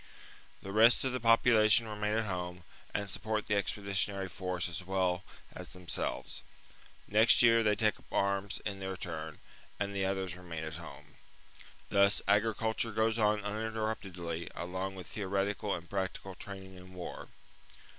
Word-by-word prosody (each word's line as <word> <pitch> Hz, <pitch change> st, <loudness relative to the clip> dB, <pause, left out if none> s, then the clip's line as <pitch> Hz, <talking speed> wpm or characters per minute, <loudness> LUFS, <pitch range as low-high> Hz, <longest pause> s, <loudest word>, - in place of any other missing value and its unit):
The 95 Hz, -, -5 dB
rest 115 Hz, +5 st, +6 dB
of 130 Hz, -, +1 dB
the 130 Hz, -, -2 dB
population 115 Hz, -1 st, +5 dB
remain 105 Hz, 0 st, -1 dB
at 115 Hz, -, +1 dB
home, 90 Hz, -2 st, -4 dB, 0.3 s
and 100 Hz, -, -2 dB
sup 100 Hz, +1 st, -4 dB
port 110 Hz, -1 st, -1 dB
the 105 Hz, -, 0 dB
expeditionary 100 Hz, -1 st, 0 dB
force 90 Hz, -2 st, -2 dB
as 90 Hz, +2 st, -4 dB
well 95 Hz, -1 st, 0 dB, 0.3 s
as -, -, -7 dB
them 90 Hz, -1 st, -12 dB
selves. -, -, -3 dB, 0.7 s
Next 110 Hz, +4 st, +6 dB
year 115 Hz, -1 st, +6 dB
they 105 Hz, -1 st, +3 dB
take 110 Hz, 0 st, +1 dB
up -, -, -23 dB
arms 100 Hz, 0 st, 0 dB
in 100 Hz, -2 st, -3 dB
their 95 Hz, -1 st, -4 dB
turn, -, -, -5 dB, 0.4 s
and 100 Hz, 0 st, -1 dB
the 95 Hz, -1 st, +1 dB
others 95 Hz, -2 st, -2 dB
remain 85 Hz, -3 st, -6 dB
at 80 Hz, 0 st, -5 dB
home. 85 Hz, -, -12 dB, 0.7 s
Thus 100 Hz, 0 st, +4 dB
agriculture 110 Hz, +2 st, +2 dB
goes 110 Hz, +1 st, +1 dB
on 105 Hz, -1 st, +3 dB
uninterruptedly 105 Hz, -6 st, -3 dB
along 95 Hz, +2 st, -3 dB
with 90 Hz, -2 st, -8 dB
theoretical 100 Hz, +2 st, -1 dB
and 85 Hz, -1 st, -8 dB
practical 95 Hz, +1 st, -3 dB
training 95 Hz, 0 st, -9 dB
in 90 Hz, 0 st, -13 dB
war. 90 Hz, -, -7 dB
100 Hz, 155 wpm, -32 LUFS, 95-110 Hz, 0.7 s, rest